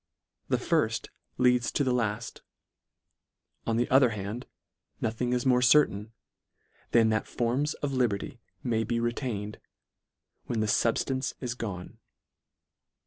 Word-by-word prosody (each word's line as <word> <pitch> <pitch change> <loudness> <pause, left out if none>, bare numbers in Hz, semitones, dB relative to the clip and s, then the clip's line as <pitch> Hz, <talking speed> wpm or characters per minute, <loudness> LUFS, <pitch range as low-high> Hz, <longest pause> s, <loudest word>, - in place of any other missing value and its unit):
The - - +2
firft - - 0 0.3
leads 125 -1 +3
to 145 - +2
the 130 -2 +1
laft; 115 -1 -2 1.3
on 115 -1 +1
the 120 - +2
other 130 -1 +6
hand 105 +2 -5 0.5
nothing 115 +2 -1
is 125 0 0
more 125 -1 +4
certain, 125 -6 +4 0.8
than 115 -2 +4
that 110 0 0
forms 130 +5 0
of 140 -1 -3
liberty 120 0 -1 0.2
may 115 -3 +1
be 115 +2 -1
retained, 115 -3 -3 0.9
when 115 - -2
the 110 - +2
fubftance 130 +5 +1
is 125 -2 -3
gone. 100 -7 -6
120 Hz, 125 wpm, -28 LUFS, 110-125 Hz, 1.3 s, other